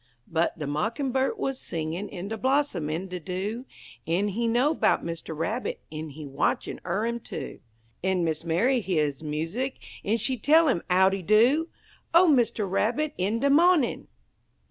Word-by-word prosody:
But 165 +1 0
de 155 - -4
Mockin'bird 250 - -1
wuz 270 - -1
singin' 165 +5 -4
in 190 +1 -6
de 225 - -2
blossom 260 - 0
en 170 +5 -3
de 180 -1 -5
dew, 195 +8 -4 0.4
En 185 +5 +1
he 230 +4 -1
know 250 +7 +3
'bout - - +2
Mister 165 -1 -5
Rabbit, 210 +11 -2
en 155 0 -5
he 150 +1 -9
watchin' 135 0 -1
er 190 +5 -1
'im, 235 0 -2
too; 155 - -7 0.4
En 190 -1 +1
Miss 160 -1 -1
Mary 230 +11 +2
heah 180 -6 +1
his 145 -1 -4
music, 165 - -3 0.3
en 220 +3 +1
she 255 +3 0
tell 315 +7 +5
'im 210 - +2
"Howdy 190 +1 +3
do!" 240 - +4 0.5
O 355 +2 +7
Mister 235 -7 +3
Rabbit, 245 +10 0
in 200 +5 +1
de 280 - +3
mawnin'! 325 -2 +3
205 Hz, 165 wpm, -26 LUFS, 165-255 Hz, 0.5 s, O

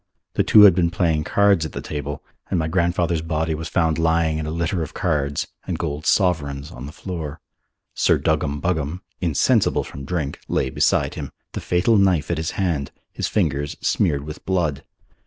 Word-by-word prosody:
The - - +2
two 105 - +6
had 100 -4 +9
been 85 -1 +2
playing 80 -3 0
cards 100 -4 +3
at 80 - -5
the - - -4
table 75 -1 -5 0.3
and 95 - 0
my 80 -1 0
grandfather's 85 -1 +1
body 80 0 -1
was 80 +1 -4
found 80 -3 +1
lying 80 -1 +2
in 75 - -3
a - - -2
litter 85 +2 -1
of 80 - -6
cards 75 -5 0 0.2
and - - -2
gold 75 +1 -3
sovereigns 70 -7 +1
on 60 +3 -8
the - - -8
floor. 80 -3 -6 0.5
Sir - - +3
Duggam 70 +1 0
Buggam, 80 0 -2 0.2
insensible 85 -5 +2
from 70 - -9
drink, 75 -1 -3
lay 65 - 0
beside - - +2
him, - - -6 0.2
the - - -5
fatal 95 +6 +2
knife 95 -5 +2
at 85 - 0
his 80 - -2
hand, 85 -8 0 0.2
his - - -2
fingers 75 -7 -1
smeared 70 -1 +1
with 75 +1 -8
blood. 80 -7 -1
80 Hz, 185 wpm, -22 LUFS, 75-90 Hz, 0.5 s, had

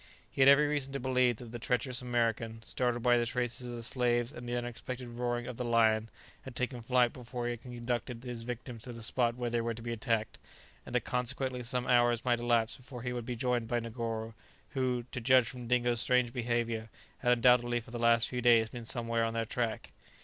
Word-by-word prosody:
He - - -2
had 135 - +7
every 140 +2 +7
reason 145 -2 -1
to 140 - -2
believe 125 -1 +2
that 115 +1 -10
the 120 - -6
treacherous 125 +2 0
American, 115 -2 -1
startled 120 -1 -1
by 120 -1 +5
the 120 - +1
traces 125 +1 -2
of 120 - -5
the 115 - -6
slaves 120 0 +1
and 120 -4 -8
the 120 - -1
unexpected 120 +1 -5
roaring 120 0 -2
of 125 -2 -6
the 125 - -2
lion, 110 -2 +3 0.3
had 130 -2 -10
taken 125 -1 -2
flight 125 0 +3
before 125 -1 -6
he 120 - 0
had 120 -1 -6
conducted 120 0 -4
his 120 -2 -5
victims 120 0 -6
to 125 - -7
the 115 -1 -7
spot 120 +1 +2
where 120 -1 -3
they 120 0 +1
were 115 0 -2
to 115 - -9
be 120 0 -3
attacked, 115 -1 -1 0.5
and - - -5
that - - +3
consequently 125 +1 -1
some 125 +1 -1
hours 120 -1 +3
might 120 -1 +2
elapse 120 -1 +1
before 125 -2 -10
he 125 0 -2
would 120 -2 -5
be 125 - -2
joined 120 -1 0
by 120 +1 0
Negoro, 115 -1 -4 0.4
who 125 -2 0
(to 125 - -4
judge 130 0 +5
from 125 -1 -7
Dingo's 120 -1 +2
strange 125 -2 +2
behaviour) 115 -2 -1 0.3
had 125 -1 +4
undoubtedly 120 0 +4
for 115 - -13
the 120 - -5
last 115 -1 +4
few 125 -1 -3
days 115 -2 +5
been 120 0 -8
somewhere 115 0 -1
on 115 0 -1
their 115 0 0
track. 115 0 -3
120 Hz, 220 wpm, -32 LUFS, 115-125 Hz, 0.5 s, had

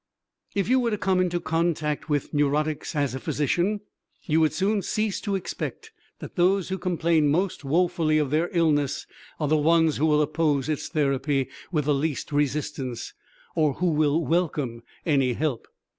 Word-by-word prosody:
If 200 -2 +1
you 260 +2 +4
were 240 -2 +1
to 210 - -1
come 190 -2 +1
into 175 -1 +1
contact 160 -2 -1
with 145 0 -1
neurotics 150 +2 0
as 145 -3 0
a 130 - -4
physician, 175 +10 0 0.4
you 160 -1 +2
would 155 -1 +3
soon 200 +6 +1
cease 215 0 -1
to 200 -2 -1
expect 320 - -5 0.3
that - - -10
those 185 +1 +2
who 190 0 -2
complain 170 -3 +2
most 175 +3 0
woefully 160 +1 +2
of 150 -3 0
their 160 +3 +1
illness 150 -5 +1 0.3
are 150 - 0
the 155 +2 +3
ones 160 0 +3
who 155 - +2
will 150 -1 +4
oppose 150 -2 0
its 155 - -2
therapy 140 -3 0 0.2
with 150 -5 0
the 150 - +3
least 145 +1 -2
resistance 145 -3 -2 0.4
or 155 -3 +2
who 180 -1 +1
will 155 +1 +2
welcome 150 -9 -1 0.2
any 135 -5 +2
help. 140 -2 -2
155 Hz, 170 wpm, -25 LUFS, 145-175 Hz, 0.4 s, you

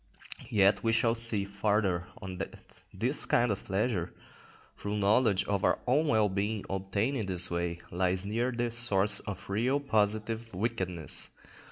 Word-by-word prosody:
_" - - -13
Yet 100 -1 +3
we 115 0 +2
shall 115 0 +3
see 115 -3 +3
farther 100 -3 0
on 95 -4 -7
that 95 - -5 0.4
this - - -1
kind 120 -1 +3
of 100 - -3
pleasure, 95 -3 -1 0.6
through 105 +1 -4
knowledge 105 0 +3
of 100 -1 -1
our - - +3
own 145 +6 +2
well 110 -5 +3
being 100 +2 -2
obtained 100 +7 -1
in 110 -5 -3
this 90 -2 +2
way, 85 0 -2
lies 90 +1 +1
very 100 +1 -5
near 120 +3 0
the 120 -1 -2
source 105 -4 +2
of 105 - -7
real, 120 +8 +1
positive 110 -2 0
wickedness. 95 -5 -1
105 Hz, 165 wpm, -30 LUFS, 95-115 Hz, 0.6 s, Yet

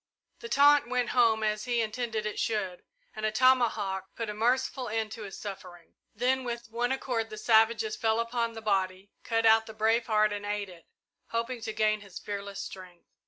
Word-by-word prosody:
The 460 - -8
taunt 290 - +5
went 250 -1 0
home, 230 -3 +3
as 215 0 -1
he 240 -1 0
intended 225 -1 -2
it 215 - -3
should, 195 -5 -2 0.3
and 215 - -6
a 215 - +1
tomahawk 215 -6 +2
put 225 -2 -3
a - - -6
merciful 250 +3 0
end 220 0 -2
to 225 - -7
his 200 -2 -7
suffering. 180 -4 -9 0.2
Then 255 +4 +1
with 235 -2 -5
one 240 +2 0
accord 245 -4 -2
the 215 - -8
savages 230 - +3
fell 225 - +1
upon 230 0 -1
the 225 -1 -9
body, 190 -1 -1
cut 225 -1 0
out 220 0 +5
the 220 - -9
brave 225 +2 +2
heart 215 -1 +3
and 205 0 -5
ate 205 -1 -3
it, 170 -3 -15 0.4
hoping 230 +1 -3
to 220 0 -4
gain 215 -1 +1
his 200 -3 -11
fearless 200 -1 -6
strength. 180 -2 -11
220 Hz, 195 wpm, -29 LUFS, 210-240 Hz, 0.4 s, taunt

